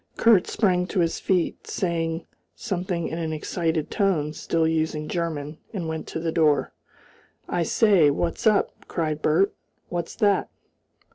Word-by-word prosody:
Kurt 220 -6 +5
sprang 180 -4 +1
to 190 - -1
his 165 -1 0
feet, 180 -3 0
saying 165 -2 -2 0.3
something 180 -5 -2
in 165 - -4
an 160 -1 -2
excited 160 0 -2
tone, 170 -8 +1
still 165 0 0
using 160 -1 -1
German, 155 -3 -3 0.2
and 175 -4 -3
went 160 0 -4
to - - -4
the 165 0 -1
door. 155 -3 +2 0.7
"I 175 - -1
say! 180 -2 +4
What's 170 +8 -1
up?" 215 -2 +1
cried 155 -2 -2
Bert. 175 +7 +3 0.4
"What's 175 -1 -4
that?" 205 -2 +2
165 Hz, 145 wpm, -25 LUFS, 160-185 Hz, 0.7 s, Kurt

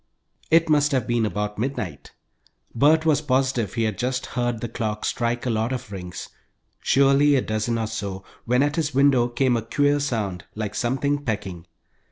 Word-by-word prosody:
It 165 +1 +4
must 145 -1 +3
have 130 -4 +1
been 120 -2 +1
about 105 +2 -3
midnight, 115 -7 -4 0.6
Bert 155 +6 +4
was 150 -2 +3
positive 130 -7 0
he 115 - +1
had 110 -3 -2
just 130 +1 -1
heard 120 -2 -2
the 120 - -3
clock 110 -2 -3
strike 120 0 -1
a 125 - 0
lot 110 +2 0
of 125 -5 -5
rings, 90 -3 -7 0.5
surely 140 +2 +4
a 130 - +3
dozen 110 +2 -1
or 115 - -1
so, 100 -3 -5 0.2
when 125 +3 +3
at 145 +2 -1
his 150 -5 -1
window 135 -3 +4
came 125 +1 +1
a 115 - 0
queer 145 +6 +1
sound, 105 -10 -2
like 105 -1 -4
something 140 +5 -1
pecking. 95 -7 -4
120 Hz, 180 wpm, -23 LUFS, 110-140 Hz, 0.6 s, It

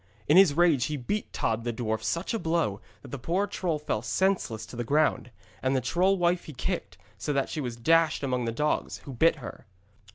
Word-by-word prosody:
In 150 - +5
his 185 -6 +7
rage 165 -8 +4
he 150 +2 -3
beat 205 - -3
Tod 115 0 -1
the 120 - -1
dwarf 110 -2 -2
such 170 - -2
a 225 - -1
blow, 160 - 0 0.2
that - - -11
the 140 - -6
poor 180 +10 0
troll 180 -5 -2
fell 145 -8 -2
senseless 125 - 0
to - - -11
the 120 - -2
ground; 150 0 +1 0.3
and 130 +1 +1
the - - +3
troll 180 +10 +2
wife 175 0 +1
he 155 - -9
kicked, 120 - -4 0.2
so 145 - -2
that 135 -1 0
she 155 - -3
was 120 -3 -4
dashed 160 +5 +3
among 125 -3 -1
the 115 - -1
dogs, 150 +6 -1
who 135 - -7
bit 160 +7 +4
her. 125 -6 -10
145 Hz, 220 wpm, -28 LUFS, 120-170 Hz, 0.3 s, his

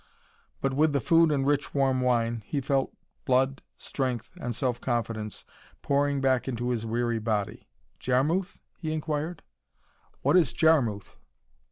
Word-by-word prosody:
But 135 0 0
with 150 +2 +3
the 140 - +2
food 165 +5 +4
and 135 -2 +1
rich 145 0 0
warm 135 -2 +2
wine, 120 -2 +1
he 145 - -1
felt 135 0 0 0.3
blood, 130 +1 +2 0.2
strength 125 -5 -3
and 120 -2 -3
self 125 -1 -1
confidence 115 -3 -3 0.4
pouring 140 0 +1
back 130 -1 +2
into 120 -1 -2
his 115 -2 -2
weary 120 0 0
body. 105 -2 -2 0.3
"Jarmuth?" 155 +10 0 0.2
he 155 -2 -3
inquired. 155 +1 -3 0.8
"What - - +3
is 175 -5 +4
Jarmuth?" 135 - +2
130 Hz, 140 wpm, -27 LUFS, 120-145 Hz, 0.8 s, food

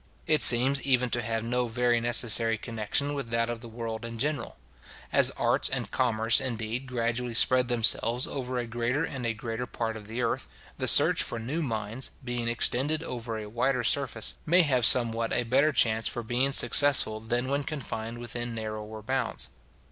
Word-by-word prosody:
It 155 -1 +1
seems 130 +3 +6
even 125 -2 +1
to 120 - -1
have 115 0 -4
no 125 +1 -2
very 120 0 -1
necessary 115 -1 +2
connection 115 +6 -3
with 140 -5 -6
that 115 0 -1
of 120 - -7
the 120 - -10
world 115 0 -7
in 115 0 -7
general. 145 0 -4 0.6
As - - +4
arts - - 0
and - - -4
commerce, 110 0 +1
indeed, 115 +1 -5
gradually 120 -1 -3
spread 125 +2 +2
themselves 120 0 +3
over 130 -2 -5
a 120 - -3
greater 120 +5 -3
and 130 -6 -5
a 115 - -3
greater 115 +2 -6
part 115 -1 -5
of 105 -1 -11
the 115 +3 -5
earth, 115 - -3 0.3
the - - -2
search - - +7
for 120 - -4
new 130 +9 -4
mines, 115 -2 -4
being 120 -1 -4
extended 135 +6 +2
over 115 -5 -6
a 110 - -7
wider 120 +3 -2
surface, 120 -2 +1
may 175 +3 +3
have 130 -6 +1
somewhat 115 -2 +4
a 125 - 0
better 135 +6 +1
chance 110 -5 +1
for 120 - -4
being 125 +4 -1
successful 130 -4 +4
than 120 +3 -3
when 140 +1 -2
confined 120 -6 -6
within 120 0 -5
narrower 110 -1 -7
bounds. 120 - -3
120 Hz, 180 wpm, -26 LUFS, 115-130 Hz, 0.6 s, search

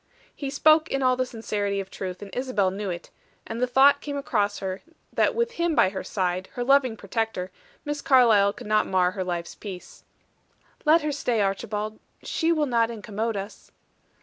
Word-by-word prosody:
He 280 - -4
spoke 310 +3 +4
in 275 0 -1
all 255 0 +4
the 255 0 -1
sincerity 205 -4 -2
of 195 -1 -6
truth, 185 0 -6
and 200 - -11
Isabel 245 -7 0
knew 200 +1 -4
it: 175 -1 -6 0.3
and 225 +2 -5
the 250 - +2
thought 275 +3 +5
came 285 -1 -4
across 210 -8 0
her 190 0 -4 0.3
that - - +2
with 470 0 0
him 340 -7 0
by 185 - +5
her 190 -1 -5
side, 185 -1 -2
her 245 - -2
loving 260 -3 +3
protector, 205 -2 -3 0.3
Miss 295 0 -3
Carlyle 225 -7 +5
could 245 - -11
not 215 0 +2
mar 180 -1 +2
her 185 0 -3
life's 175 -1 -4
peace. 190 -4 -10 0.8
"Let 315 +1 +5
her 300 - 0
stay, 250 -5 -1
Archibald; 210 +2 -2 0.2
she 330 0 0
will 310 -3 +2
not 230 -4 +2
incommode 220 0 -3
us." 200 +2 -8
225 Hz, 185 wpm, -25 LUFS, 195-275 Hz, 0.8 s, thought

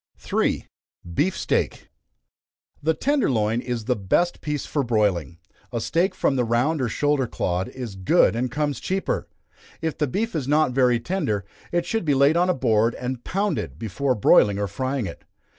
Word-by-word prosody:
3. - - -1 0.5
Beef 175 - +1
Steak. - - -1 0.9
The 160 +2 +1
tender 285 - +1
loin 110 -1 +1
is 120 -4 -4
the 125 +1 +1
best 115 - 0
piece 150 -2 -3
for 145 - -1
broiling 100 - 0 0.3
a 120 - -2
steak 170 - 0
from 135 - +1
the 125 - +2
round 125 +7 +1
or 125 - 0
shoulder 145 0 +1
clod 90 -3 -2
is 125 -5 -7
good 95 +1 +3
and 125 +2 -1
comes 145 +3 -1
cheaper. 190 +1 -2 0.5
If 160 -2 -3
the 150 - +2
beef 220 - -2
is 140 -5 -2
not 150 -1 +3
very 125 -2 +3
tender, 115 - -2 0.3
it 175 0 0
should 225 +3 -1
be 145 -4 +2
laid 140 +3 +4
on 175 +2 +3
a 180 - +2
board 115 -2 +2
and 125 -1 -4
pounded, 195 - -2
before 125 - -1
broiling 100 -1 +5
or 100 0 -1
frying 130 +4 -2
it. 85 - -8
130 Hz, 175 wpm, -24 LUFS, 110-155 Hz, 0.9 s, broiling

